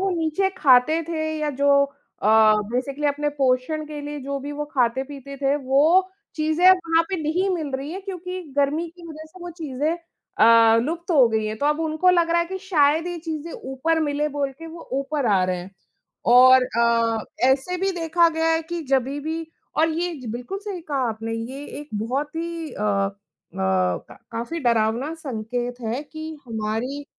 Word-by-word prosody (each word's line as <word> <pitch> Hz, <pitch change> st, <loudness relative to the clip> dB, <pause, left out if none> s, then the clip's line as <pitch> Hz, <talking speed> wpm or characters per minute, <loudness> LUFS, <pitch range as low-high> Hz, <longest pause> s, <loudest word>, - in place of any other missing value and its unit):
वो 385 Hz, 0 st, +1 dB
नीचे 335 Hz, +3 st, 0 dB
खाते 275 Hz, +4 st, +5 dB
थे 320 Hz, -2 st, -2 dB, 0.2 s
या 300 Hz, -1 st, -1 dB
जो 280 Hz, 0 st, +4 dB, 0.4 s
अ, -, -, +1 dB, 0.5 s
बेसिकली 275 Hz, +4 st, -1 dB
अपने 295 Hz, +1 st, 0 dB
पोषण 270 Hz, +4 st, +1 dB
के 300 Hz, -1 st, -7 dB
लिए 290 Hz, 0 st, -6 dB
जो 280 Hz, +1 st, -3 dB
भी 290 Hz, +2 st, -6 dB
वो 295 Hz, +1 st, -3 dB
खाते-पीते 270 Hz, +3 st, -1 dB
थे 275 Hz, +1 st, +1 dB
वो 300 Hz, +8 st, +3 dB, 0.3 s
चीज़ें 315 Hz, +3 st, 0 dB
अब 375 Hz, -, +9 dB
वहाँ 330 Hz, 0 st, +4 dB
पे 380 Hz, -, -1 dB
नहीं 355 Hz, +6 st, 0 dB
मिल 310 Hz, -5 st, -3 dB
रही 275 Hz, +3 st, -6 dB
है 380 Hz, -, -5 dB
क्योंकि 370 Hz, -1 st, -6 dB, 0.2 s
गर्मी 290 Hz, +4 st, +1 dB
की 340 Hz, -1 st, -12 dB
वजह 315 Hz, 0 st, -9 dB
से 315 Hz, +4 st, -16 dB
वो 350 Hz, -, -6 dB
चीज़ें 305 Hz, +2 st, -1 dB, 0.4 s
अ, 230 Hz, 0 st, +6 dB
लुप्त 335 Hz, +5 st, -4 dB
हो 265 Hz, -7 st, +6 dB
गई 220 Hz, -1 st, 0 dB
हैं, 215 Hz, +1 st, -3 dB
तो 290 Hz, -, 0 dB
अब 300 Hz, +2 st, +1 dB
उनको 320 Hz, +3 st, +2 dB
लग 340 Hz, -2 st, +2 dB
रहा 340 Hz, -, +3 dB
है 340 Hz, -, -1 dB
कि 380 Hz, +1 st, -5 dB
शायद 320 Hz, -3 st, +2 dB
ये 350 Hz, -1 st, -3 dB
चीज़ें 320 Hz, 0 st, -5 dB
ऊपर 295 Hz, +5 st, -1 dB
मिले 295 Hz, 0 st, 0 dB
बोल 280 Hz, -1 st, -2 dB
के 330 Hz, -, -9 dB
वो 330 Hz, +1 st, -11 dB
ऊपर 275 Hz, 0 st, -1 dB
आ 195 Hz, -4 st, +3 dB
रहे 185 Hz, 0 st, -1 dB
हैं। 180 Hz, +2 st, -8 dB, 0.6 s
और 255 Hz, +1 st, +7 dB, 0.2 s
अ, 230 Hz, -1 st, +2 dB, 0.2 s
ऐसे 270 Hz, +7 st, +1 dB
भी 385 Hz, +1 st, +1 dB
देखा 330 Hz, +1 st, +3 dB
गया 325 Hz, 0 st, 0 dB
है 325 Hz, 0 st, +1 dB
कि 340 Hz, +1 st, -5 dB
जभी 270 Hz, +2 st, +1 dB
भी 320 Hz, +2 st, -4 dB, 0.3 s
और 320 Hz, +1 st, +4 dB
ये 345 Hz, +2 st, -2 dB
जी 250 Hz, -, -9 dB
बिल्कुल 245 Hz, +12 st, -5 dB
सही 395 Hz, -4 st, -5 dB
कहा 270 Hz, -5 st, 0 dB
आपने। 225 Hz, +1 st, -4 dB
ये 255 Hz, +5 st, -6 dB, 0.2 s
एक 295 Hz, -, -11 dB
बहुत 265 Hz, +7 st, -2 dB
ही 330 Hz, -1 st, -4 dB
अ, 210 Hz, -, -6 dB
अ, 195 Hz, -1 st, 0 dB, 0.5 s
क 95 Hz, -1 st, 0 dB, 0.2 s
काफ़ी 235 Hz, +9 st, -4 dB
डरावना 235 Hz, +4 st, +1 dB
संकेत 245 Hz, -5 st, -4 dB
है 235 Hz, +5 st, -3 dB
कि 315 Hz, +1 st, -8 dB
हमारी 225 Hz, +6 st, -3 dB
290 Hz, 190 wpm, -23 LUFS, 250-325 Hz, 0.6 s, अब